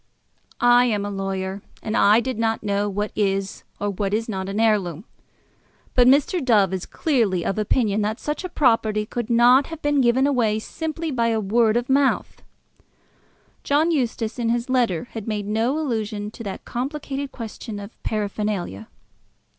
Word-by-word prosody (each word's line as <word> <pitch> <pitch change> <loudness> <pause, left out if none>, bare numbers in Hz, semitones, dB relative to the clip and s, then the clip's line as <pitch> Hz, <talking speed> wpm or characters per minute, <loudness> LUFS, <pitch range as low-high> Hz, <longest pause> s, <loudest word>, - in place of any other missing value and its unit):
"I 245 0 +5
am 210 -4 0
a 205 - -4
lawyer, 195 0 -3 0.2
and 220 - -2
I 210 +3 +5
did 255 -2 -4
not 225 -1 0
know 205 0 0
what 205 +1 -2
is 195 -2 -1 0.2
or 205 0 -1
what 200 +1 -1
is 225 +1 -2
not 190 -3 -4
an 200 +2 -2
heirloom. 205 -5 +1 0.9
But 245 -1 +5
Mr. 290 +5 +3
Dove 205 -7 +3
is 185 - -4
clearly 225 - 0
of 205 - -1
opinion 215 -1 +1
that 215 +2 -2
such 300 +4 -3
a 365 - -4
property 225 -8 +2
could 240 +1 -4
not 245 +3 +5
have 325 -1 -7
been 290 -1 +2
given 250 +2 +3
away 240 -7 +2
simply 320 +7 -4
by 230 -3 +1
word 220 +2 +2
of 240 +1 -2
mouth." 270 0 +1 1.2
John 305 +4 +2
Eustace 240 -5 -1
in 230 -1 0
his 240 +2 -1
letter 235 -10 +1
had 220 -2 -7
made 210 -2 -2
no 225 +7 0
allusion 215 -7 -3
to 230 - -9
that 195 - -6
complicated 275 +2 -4
question 225 -1 -7
of 200 +1 -11
paraphernalia. 205 - -3
225 Hz, 165 wpm, -23 LUFS, 205-255 Hz, 1.2 s, I